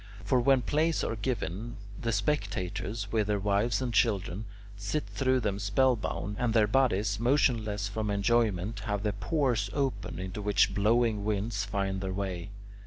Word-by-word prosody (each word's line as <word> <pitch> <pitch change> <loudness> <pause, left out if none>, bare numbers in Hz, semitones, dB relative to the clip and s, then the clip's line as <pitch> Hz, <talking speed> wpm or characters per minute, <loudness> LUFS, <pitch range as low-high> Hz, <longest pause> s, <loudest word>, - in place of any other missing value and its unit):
For 125 +6 +2
when 130 +1 +4
plays 160 +4 +1
are 115 - -1
given, 110 -1 -3 0.2
the 115 - 0
spectators, 100 -3 -2
with 110 -2 +1
their 105 -1 +1
wives 105 +4 +1
and 120 -2 -2
children, 100 -2 +1 0.3
sit 100 +9 -2
through 130 -1 +1
them 100 -3 -1
spell 125 +5 +3
bound, 105 -1 -4
and 120 -2 0
their 110 -2 +6
bodies, 105 -4 +2
motionless 115 -5 +1
from 105 +1 -3
enjoyment, 105 -1 +1
have 105 -2 -2
the 105 -2 0
pores 110 - 0
open, 140 -2 -2
into 95 +3 -5
which 105 0 +3
blowing 110 0 +2
winds 105 0 -1
find 100 -1 -2
their 95 -1 -3
way. 95 -1 -3
105 Hz, 160 wpm, -29 LUFS, 100-120 Hz, 0.3 s, their